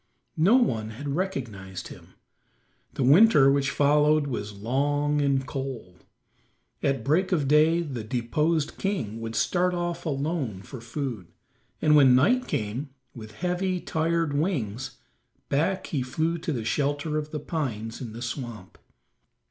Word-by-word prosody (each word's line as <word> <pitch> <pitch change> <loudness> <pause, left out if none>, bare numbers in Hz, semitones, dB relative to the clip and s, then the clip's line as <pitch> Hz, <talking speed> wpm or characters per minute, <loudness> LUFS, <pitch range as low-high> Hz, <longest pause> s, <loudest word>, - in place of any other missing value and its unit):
No 185 +9 +5
one 115 - +1
had 140 +6 -6
recognized 110 - -4
him. - - -14 0.8
The - - 0
winter 145 - +6
which 140 0 +1
followed 150 +1 +3
was 105 -6 -4
long 145 +6 0
and 135 -2 +1
cold. 130 -10 -6 0.8
At 135 -4 0
break 165 - +1
of 150 -7 +1
day 155 +4 +4
the 130 -8 -5
deposed 145 +7 -1
king 145 - -2
would 115 0 -5
start 180 +9 +1
off 175 0 -3
alone 140 - -2
for 130 0 -9
food, 115 - -5 0.6
and 150 0 +5
when 135 -4 +7
night 245 - +3
came, 115 +7 -3 0.2
with 110 -2 -10
heavy, 180 - -1
tired 165 -2 0
wings, 135 - -2 0.5
back 175 +7 0
he 145 - -2
flew 160 +7 -1
to 165 0 -3
the 120 -6 -3
shelter 145 +5 0
of 150 0 -6
the 150 - -4
pines 120 -8 -4
in 115 -4 -6
the 120 +2 -6
swamp. 120 -6 -6
140 Hz, 140 wpm, -26 LUFS, 120-160 Hz, 0.8 s, when